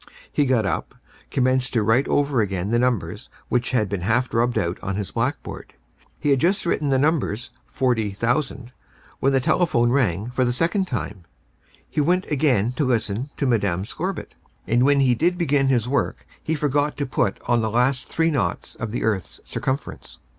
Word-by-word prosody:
He 145 Hz, -2 st, +2 dB
got 120 Hz, -5 st, +2 dB
up, 100 Hz, -, -2 dB, 0.3 s
commenced 130 Hz, -1 st, +1 dB
to 115 Hz, -3 st, +2 dB
write 115 Hz, +6 st, +3 dB
over 140 Hz, -4 st, +2 dB
again 95 Hz, -1 st, -2 dB
the 120 Hz, -, +3 dB
numbers 125 Hz, -5 st, -1 dB, 0.2 s
which 125 Hz, 0 st, +1 dB
had 115 Hz, -5 st, +1 dB
been 100 Hz, -1 st, -3 dB
half 115 Hz, +7 st, +1 dB
rubbed 120 Hz, +1 st, +1 dB
out 85 Hz, +1 st, -1 dB
on 95 Hz, -1 st, -3 dB
his 100 Hz, -1 st, -3 dB
blackboard. 125 Hz, -, -3 dB, 0.4 s
He 145 Hz, -, +1 dB
had 135 Hz, -, +4 dB
just 185 Hz, +7 st, +1 dB
written 155 Hz, -4 st, 0 dB
the 135 Hz, -, +3 dB
numbers 130 Hz, -6 st, 0 dB, 0.2 s
40,000 120 Hz, +2 st, -1 dB, 0.5 s
when 135 Hz, -, +2 dB
the 135 Hz, -, +3 dB
telephone 125 Hz, -4 st, +2 dB
rang 115 Hz, -4 st, +1 dB
for 130 Hz, +1 st, +1 dB
the 120 Hz, -, +1 dB
second 170 Hz, +8 st, +1 dB
time. 105 Hz, -, -4 dB, 0.6 s
He 150 Hz, -, -1 dB
went 180 Hz, +5 st, +2 dB
again 130 Hz, -7 st, +2 dB
to -, -, +2 dB
listen 120 Hz, 0 st, 0 dB
to 140 Hz, -, 0 dB
Mme. 100 Hz, -7 st, +1 dB
Scorbitt, 185 Hz, -, -4 dB, 0.3 s
and 120 Hz, +2 st, +2 dB
when 140 Hz, 0 st, +4 dB
he 130 Hz, -2 st, +4 dB
did 175 Hz, +9 st, +1 dB
begin 145 Hz, -5 st, +2 dB
his 125 Hz, -4 st, +2 dB
work 140 Hz, +2 st, -1 dB, 0.2 s
he 160 Hz, -, -1 dB
forgot 145 Hz, 0 st, 0 dB
to 145 Hz, -, -1 dB
put 105 Hz, -6 st, 0 dB
on 120 Hz, -1 st, +3 dB
the 110 Hz, -, 0 dB
last 125 Hz, +4 st, +1 dB
three 165 Hz, 0 st, +1 dB
naughts 115 Hz, -, -2 dB
of 115 Hz, -, -5 dB
the 115 Hz, -, -3 dB
earth's 105 Hz, -5 st, -1 dB
circumference. 130 Hz, -1 st, -4 dB
125 Hz, 180 wpm, -23 LUFS, 110-140 Hz, 0.6 s, had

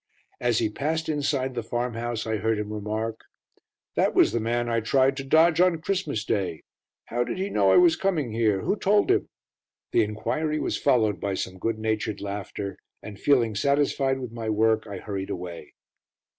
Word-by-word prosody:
As 120 Hz, -2 st, +1 dB
he 115 Hz, -, +2 dB
passed 155 Hz, +8 st, -2 dB
inside 140 Hz, -3 st, 0 dB
the 120 Hz, -, -2 dB
farm 120 Hz, +2 st, -2 dB
house, 115 Hz, 0 st, -3 dB
I 110 Hz, -1 st, -1 dB
heard 110 Hz, +2 st, 0 dB
him 105 Hz, 0 st, -4 dB
remark: 110 Hz, +2 st, -3 dB, 0.7 s
"That -, -, +1 dB
was -, -, +5 dB
the 115 Hz, -, 0 dB
man 120 Hz, +2 st, -1 dB
I 115 Hz, -1 st, +1 dB
tried 130 Hz, +4 st, +2 dB
to 135 Hz, -, -3 dB
dodge 160 Hz, +4 st, +4 dB
on 180 Hz, -3 st, +3 dB
Christmas 155 Hz, -, -2 dB
Day. 90 Hz, -9 st, -2 dB, 0.4 s
How 120 Hz, +1 st, -1 dB
did 120 Hz, -, -4 dB
he 195 Hz, +2 st, -2 dB
know 100 Hz, -2 st, +3 dB
I -, -, +6 dB
was 175 Hz, -2 st, +6 dB
coming 160 Hz, -, -1 dB
here? 110 Hz, -3 st, +1 dB
Who -, -, 0 dB
told 205 Hz, 0 st, +2 dB
him?" -, -, +1 dB, 0.6 s
The 115 Hz, -, +4 dB
enquiry 150 Hz, +9 st, -2 dB
was -, -, -1 dB
followed 110 Hz, -8 st, +2 dB
by 100 Hz, +1 st, -2 dB
some 95 Hz, 0 st, -5 dB
good 115 Hz, +3 st, -1 dB
natured 110 Hz, -1 st, -2 dB
laughter, 100 Hz, 0 st, -5 dB, 0.3 s
and 100 Hz, -2 st, -9 dB
feeling 120 Hz, -6 st, +3 dB
satisfied 140 Hz, +2 st, +1 dB
with 125 Hz, -3 st, -6 dB
my 115 Hz, -1 st, -4 dB
work, 110 Hz, +1 st, +2 dB
I 100 Hz, -2 st, -6 dB
hurried 95 Hz, 0 st, -5 dB
away. 90 Hz, -2 st, -7 dB
115 Hz, 185 wpm, -26 LUFS, 105-140 Hz, 0.7 s, I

